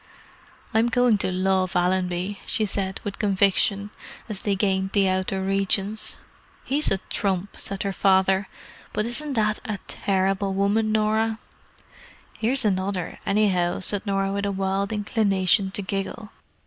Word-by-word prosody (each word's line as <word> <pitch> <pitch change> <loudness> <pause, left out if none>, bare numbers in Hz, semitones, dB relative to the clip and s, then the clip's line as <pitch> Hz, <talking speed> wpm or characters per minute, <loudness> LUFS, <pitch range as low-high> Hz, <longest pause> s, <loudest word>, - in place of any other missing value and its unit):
"I'm 225 +2 +3
going 245 -3 +3
to 185 - 0
love 185 0 +1
Allenby," 180 +2 0
she 225 -4 0
said 190 -1 -2
with 200 -1 -5
conviction, 200 0 +2 0.4
as 210 -3 -4
they 200 -1 0
gained 190 -1 0
the 200 -2 +3
outer 190 +1 0
regions. 195 +2 0 0.5
"He's 290 +3 +1
a 195 - +2
trump!" 195 -1 -1
said 195 -1 -3
her 200 -1 -2
father. 190 0 +3 0.5
"But 215 - 0
isn't 280 +5 -2
that 215 -3 +1
a 215 -2 -3
terrible 195 0 0
woman, 210 +3 +1
Norah!" 220 +1 +1 1.0
"Here's 250 +2 +2
another, 190 -3 -1
anyhow," 190 -4 +2
said 205 +2 0
Norah 195 0 0
with 200 0 -1
a - - 0
wild 195 +1 -1
inclination 200 -3 +1
to 195 +1 -3
giggle. 195 +3 -4
200 Hz, 140 wpm, -24 LUFS, 190-215 Hz, 1.0 s, I'm